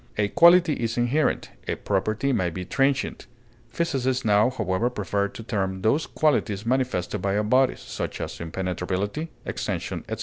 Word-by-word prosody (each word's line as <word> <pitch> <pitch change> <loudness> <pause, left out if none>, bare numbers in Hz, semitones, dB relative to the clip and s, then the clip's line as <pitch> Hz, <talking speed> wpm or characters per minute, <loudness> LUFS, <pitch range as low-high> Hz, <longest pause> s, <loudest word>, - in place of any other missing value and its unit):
A 105 -1 +1
quality 170 - +6
is 115 -2 -2
inherent; 125 +6 +1 0.2
a - - 0
property 110 +7 0
may 90 -6 +1
be 90 +2 -6
transient; 135 +5 0 0.4
physicists 130 -6 -1
now, 105 +2 +4
however, 110 -2 0
prefer 100 -3 -1
to 115 - -10
term 95 -4 -2
those 140 +9 +2
qualities 115 -9 0
manifested 125 -9 0
by 100 +1 0
all 105 - +1
bodies 130 +4 +2
(such - - -5
as - - -5
impenetrability, 95 - -3 0.2
extension, - - -3
etc.) - - -4
110 Hz, 155 wpm, -25 LUFS, 95-130 Hz, 0.4 s, quality